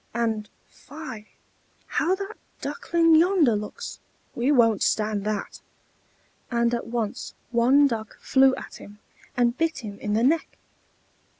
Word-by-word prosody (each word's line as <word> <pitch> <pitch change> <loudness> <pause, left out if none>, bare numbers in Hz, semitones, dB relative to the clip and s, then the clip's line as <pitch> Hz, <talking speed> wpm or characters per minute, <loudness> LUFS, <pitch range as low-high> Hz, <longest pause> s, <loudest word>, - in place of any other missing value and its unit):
And 220 -3 -1 0.2
fie! 250 -8 -10 0.6
how 360 +4 +1
that 395 +2 -6 0.3
Duckling 330 +3 +1
yonder 325 - +5
looks: 210 0 -6 0.3
we 250 +4 +1
won't 230 -7 +4
stand 210 -2 0
that!" 210 -1 -3 0.9
And 235 -1 +1
at 235 - -2
once 230 -3 -3 0.2
one 255 +5 +5
Duck 225 -5 -3
flew 265 0 +4
at - - -9
him, 205 +1 -13 0.4
and 240 -1 +3
bit 325 -3 -1
him 205 -1 -8
in 210 - -2
the 225 +2 +2
neck. 315 +5 +1
235 Hz, 130 wpm, -25 LUFS, 215-295 Hz, 0.9 s, yonder